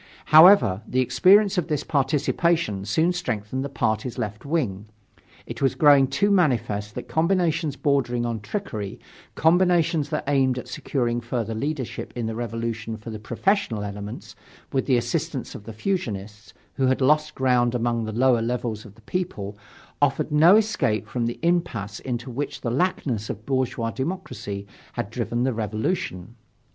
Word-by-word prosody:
However, 155 - +8
the 130 - 0
experience 185 - +4
of 170 - -3
this 150 -4 -1
participation 150 - 0
soon 160 - +2
strengthened 130 - -3
the 140 - -4
party's 115 -2 -1
left 105 +3 -4
wing. 115 - -2 0.6
It - - -8
was 135 - +2
growing 145 -3 +6
too 205 +9 +1
manifest 115 - +1
that - - -6
combinations 165 -3 +1
bordering 130 -4 0
on 115 -2 -2
trickery, 105 - -5 0.4
combinations 165 -3 +3
that 150 - -2
aimed 135 -2 +2
at 125 - -6
securing 120 -2 -2
further 115 -2 -3
leadership 135 +2 -4
in 120 -2 -2
the 110 - -3
Revolution 115 -1 -4
for 115 +1 -9
the 110 - -6
professional 120 - 0
elements, 100 +1 -7 0.4
with 135 - 0
the 130 -3 +4
assistance 135 +3 -2
of 105 - -10
the 115 - -7
fusionists, 105 - -4 0.3
who 135 -2 +2
had 130 - +2
lost 150 +3 +2
ground 125 -2 +2
among 120 -1 0
the 110 - -4
lower 120 +1 +3
levels 115 -2 -3
of 105 -2 -13
the 110 - -20
people, 110 - -4 0.5
offered 145 +2 +1
no 160 +6 +7
escape 205 - +1
from 120 -2 -2
the 120 - -4
impasse 120 - -1
into 120 -1 -4
which 140 +4 -4
the 115 - -2
laxness 130 - -1
of 110 +1 -6
bourgeois 130 -4 -1
democracy 115 - -5 0.3
had - - -4
driven 120 +1 -2
the 130 0 +1
revolution. 110 - -3
125 Hz, 155 wpm, -24 LUFS, 110-155 Hz, 0.6 s, However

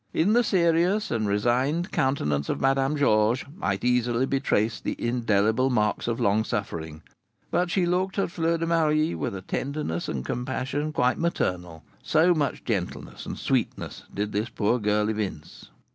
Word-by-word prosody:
In 190 +7 +3
the 240 +1 +4
serious 180 +1 +2
and 110 -2 0
resigned 125 - +1
countenance 75 - 0
of - - -1
Madame 135 +2 +2
Georges 110 -2 +2
might 95 - -2
easily 125 0 +2
be 135 0 0
traced 110 -4 0
the - - -2
indelible 115 +1 +1
marks 105 -4 0
of 115 -1 -1
long 105 +2 +2
suffering; 80 -9 -4 0.5
but 175 0 +1
she 180 0 +1
looked 185 +3 0
at 195 - 0
Fleur 165 0 0
de 165 - -2
Marie 155 - +2
with 80 +3 -3
a 95 - -7
tenderness 135 - -3
and 65 -2 -3
compassion 130 - -2
quite 125 -3 +1
maternal, 90 - -2 0.2
so 165 +3 +4
much 150 -4 -1
gentleness 100 -7 -4
and - - -5
sweetness - - -2
did 105 +1 -3
this 105 +3 -1
poor 115 +2 0
girl 105 0 +1
evince. 105 -8 -5
125 Hz, 160 wpm, -26 LUFS, 105-155 Hz, 0.5 s, the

